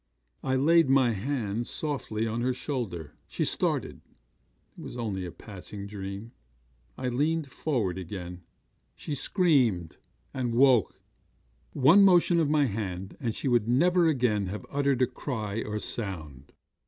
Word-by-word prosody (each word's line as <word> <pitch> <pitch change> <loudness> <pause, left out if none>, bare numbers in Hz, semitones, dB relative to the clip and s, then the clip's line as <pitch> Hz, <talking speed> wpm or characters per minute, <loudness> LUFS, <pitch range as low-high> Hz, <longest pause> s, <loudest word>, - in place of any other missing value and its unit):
I 130 0 0
laid 160 +2 +4
my 135 -3 +4
hand 115 0 -2
softly 130 -8 -2
on 115 +1 -2
her 125 +1 0
shoulder. 95 - -4
She - - -2
started - - -1 0.7
it - - -11
was - - -8
only 100 -6 -3
a - - -7
passing 100 +1 -9
dream. 100 +2 -7 0.7
I 130 - -3
leaned 145 +3 0
forward 110 - -1
again. 90 -1 -7 0.5
She 150 - -6
screamed, 130 - +1 0.4
and 125 -3 -2
woke. 125 -4 +4 0.7
'One 150 +9 +6
motion 175 -2 +5
of 155 -3 +2
my 150 -1 +3
hand, 95 -4 -4
and 120 -5 -2
she - - -3
would 120 -4 +2
never 170 +8 +4
again 120 -9 +1
have 105 +3 -6
uttered 140 -3 +2
cry 110 -5 -3
or 105 0 -3
sound. 80 - -5
120 Hz, 140 wpm, -28 LUFS, 100-140 Hz, 0.7 s, One